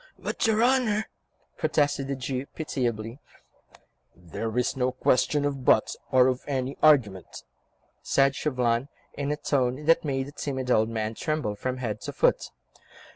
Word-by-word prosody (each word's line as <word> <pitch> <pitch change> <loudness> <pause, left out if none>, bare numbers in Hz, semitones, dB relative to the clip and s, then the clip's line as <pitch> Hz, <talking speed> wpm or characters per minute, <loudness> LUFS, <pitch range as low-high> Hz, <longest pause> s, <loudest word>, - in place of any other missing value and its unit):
"But - - -2
your 220 +1 +3
Honour—" 240 -4 +2 0.5
protested 145 -3 +1
the 140 - -2
Jew 130 +1 -4
pitiably. 120 -5 -3 1.0
"There 110 +7 -5
is 125 - +1
no 130 -1 0
question 135 +3 +1
of 140 -2 -2
'but' 110 - +3 0.2
or 130 -1 +6
of 130 0 +1
any 135 -1 -2
argument," 115 - +2 0.6
said 135 0 +2
Chauvelin, 125 -3 0 0.2
in 140 0 -3
a 150 - -1
tone 130 0 -1
that 165 +1 +4
made 135 -3 -1
the 140 - -10
timid 130 -3 -3
old 110 -1 +3
man 110 -1 -2
tremble 155 -4 -2
from 130 +5 -4
head 110 -4 -4
to - - -6
foot. - - +1
130 Hz, 150 wpm, -26 LUFS, 120-145 Hz, 1.0 s, or